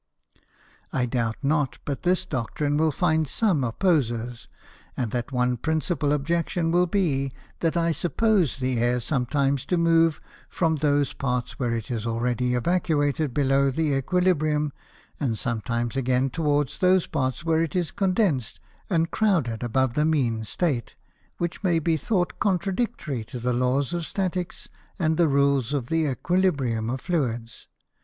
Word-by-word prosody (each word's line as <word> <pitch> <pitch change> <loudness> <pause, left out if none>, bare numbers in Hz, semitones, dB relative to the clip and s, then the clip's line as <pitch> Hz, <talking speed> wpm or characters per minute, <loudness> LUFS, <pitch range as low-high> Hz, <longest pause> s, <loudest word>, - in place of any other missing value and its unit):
I 130 -2 0
doubt 115 -2 -1
not 145 -1 +1
but 140 -2 -3
this 185 +1 +1
Doctrine 145 +1 -2
will 155 +1 +3
find 160 0 +1
some 180 - +1
Opposers, 120 -4 0 0.5
and 120 -4 -1
that 120 +2 -3
one 125 -1 +1
principal 160 +1 0
Objection 165 +3 0
will 180 +1 +3
be, 145 -8 0 0.3
that 165 +1 0
I 170 0 +2
suppose 175 - +1
the 130 -2 -1
Air 120 +1 +2
sometimes 135 +1 0
to 180 - +1
move 165 -2 +3 0.3
from 160 -3 +1
those 145 -1 +1
Parts 125 -3 -3
where 120 -3 0
it 115 +1 -5
is 115 -1 -2
already 125 +2 0
evacuated 150 -1 +1
below 135 +1 +2
the 155 +3 0
Æquilibrium, 155 -2 +1 0.5
and 120 -7 -1
sometimes 115 0 -2
again 130 0 +1
towards 145 -3 0
those 185 -1 +4
parts, 130 0 -2
where 160 -1 +2
it 165 -1 -2
is 175 -3 0
condens'd 185 - 0 0.3
and 165 -3 +1
crouded 165 - +1
above 125 +1 +1
the 150 - +1
mean 130 -8 +1
State, 125 - -2 0.4
which 175 +3 -3
may 175 -3 +3
be 165 0 +1
thought 175 +4 -1
contradictory 190 - -1
to 125 +2 -7
the 125 +1 0
Laws 130 +5 +1
of 175 - -1
Staticks 185 -2 -3 0.3
and 160 -2 +1
the 170 - +4
Rules 140 -2 +2
of 130 -4 -2
the 160 -1 +1
Æquilibrium 135 -7 0
of 130 0 -4
Fluids. 120 -9 -2
145 Hz, 150 wpm, -25 LUFS, 125-170 Hz, 0.5 s, those